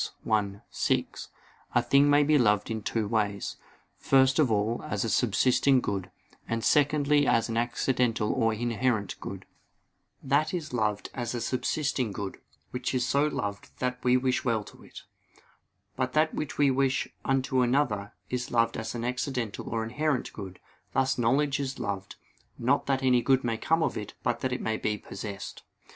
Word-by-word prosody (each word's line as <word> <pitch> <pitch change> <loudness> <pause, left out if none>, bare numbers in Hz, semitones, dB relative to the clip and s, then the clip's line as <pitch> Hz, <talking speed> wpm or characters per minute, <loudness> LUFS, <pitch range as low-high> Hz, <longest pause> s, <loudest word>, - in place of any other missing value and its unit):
_ 105 -3 +1
i, - - -22
6, - - -1 0.5
a 120 - +5
thing 140 +4 +4
may 145 0 +5
be 150 0 +4
loved 105 -2 +2
in 110 -1 -2
two 110 +1 -1
ways; 105 -2 -1 0.4
first 135 +1 +4
of 140 -7 +4
all 110 +2 0
as 125 - -1
a - - -1
subsisting 125 +4 +3
good; 95 -5 -3 0.4
and 115 0 -2
secondly 145 0 +3
as 115 - +2
an 115 - -2
accidental 120 -1 +1
or 115 0 +2
inherent 115 -2 0
good. - - -7 0.8
That 145 +6 +1
is 155 -6 -5
loved 105 -3 -1
as 120 -1 -3
a - - -2
subsisting 130 0 -1
good, 100 -1 -5 0.3
which 125 +1 -2
is 125 -1 +1
so 140 +3 +3
loved 100 -8 -5
that 125 0 -2
we 125 0 +4
wish 130 0 0
well 115 -4 0
to - - -15
it. - - -12 0.9
But 130 -1 -1
that 155 +1 +2
which 150 - -4
we 145 -2 +4
wish 135 +1 +1 0.2
unto 130 -1 +1
another, 120 -5 +1
is 125 +1 -3
loved 115 -1 +2
as 110 +1 -4
an 120 0 -3
accidental 125 -3 -3
or 115 -1 -1
inherent 135 +4 -1
good: 95 -3 -8 0.3
thus 135 -1 +1
knowledge 140 +4 +2
is 135 -1 -3
loved, 100 -1 -4 0.4
not 130 +4 +1
that 135 -1 +1
any 125 -2 +4
good 130 +1 +3
may 115 -2 0
come 160 +5 +2
to - - -4
it 105 - -10
but 120 - 0
that 130 - -2
it 125 - -2
may 110 0 -1
be 105 -1 -1
possessed. 100 -1 -7
125 Hz, 175 wpm, -28 LUFS, 110-135 Hz, 0.9 s, a